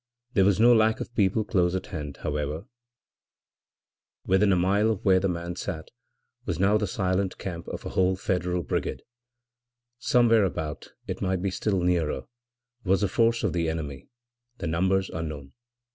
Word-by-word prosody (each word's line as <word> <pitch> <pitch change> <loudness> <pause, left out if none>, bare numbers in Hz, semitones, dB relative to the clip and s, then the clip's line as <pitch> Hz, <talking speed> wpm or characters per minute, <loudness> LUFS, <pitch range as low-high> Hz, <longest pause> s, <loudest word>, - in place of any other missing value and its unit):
There 95 - +4
was 100 0 +3
no 120 +2 +7
lack 110 -1 +3
of - - -6
people 105 0 +2
close 90 -3 +1
at 95 - -3
hand, 75 -4 -5
however; 75 +2 -2 1.6
within 95 +2 +3
a - - +4
mile 100 +5 +2
of 110 -4 -2
where 95 -2 +5
the 95 +1 0
man 85 0 -4
sat 80 -2 -5 0.5
was 85 - -2
the 95 - +2
now 105 +2 +4
silent 95 -2 -1
camp 85 -3 -6
of - - -6
a - - -3
whole 95 0 +2
Federal 90 -2 -1
brigade. - - -3 1.0
Somewhere 115 -4 +4
about 80 -5 -4
it - - -5
might 95 -1 -1
be 100 - 0
still 95 0 0
nearer 85 -6 0 0.6
was 95 +1 +2
a - - +3
force 115 +4 +2
of - - 0
the 85 -2 0
enemy, 75 -4 -5 0.5
the - - -5
numbers 95 +4 +1
unknown. 75 -4 -6
95 Hz, 165 wpm, -26 LUFS, 85-100 Hz, 1.6 s, no